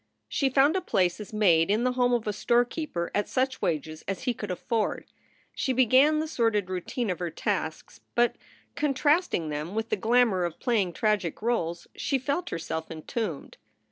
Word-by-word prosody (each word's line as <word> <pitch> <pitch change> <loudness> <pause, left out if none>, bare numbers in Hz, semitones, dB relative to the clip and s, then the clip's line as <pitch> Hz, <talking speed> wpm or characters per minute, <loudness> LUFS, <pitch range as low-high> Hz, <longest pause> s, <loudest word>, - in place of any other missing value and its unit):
She 270 - +1
found 275 +5 +4
a 380 - +1
place 180 - +1
as 210 - -8
maid 180 -6 +4
in 215 +4 +2
the 255 - +2
home 245 -1 +2
of 240 -2 +1
a 210 - -1
storekeeper 240 - 0
at 205 - 0
such 260 0 0
wages 155 -1 -2
as 195 - -3
he 250 - +1
could 210 -2 -6
afford. 215 +4 -1 0.5
She 260 - -1
began 260 +5 +5
the 310 +1 -1
sordid 225 - 0
routine 185 +4 -2
of 180 - -4
her 175 -1 -2
tasks, 165 -1 -3
but, 240 0 +3 0.4
contrasting 290 - +1
them 150 +6 -4
with 220 0 -2
the - - +2
glamour 230 -5 +3
of 170 -2 -3
play 235 -4 +2
ing 180 -2 -2
tragic 205 -1 -1
roles, 170 -8 -1
she 275 - 0
felt 285 +7 -2
herself 160 -1 -4
entombed. 165 - -5
220 Hz, 180 wpm, -27 LUFS, 175-255 Hz, 0.5 s, began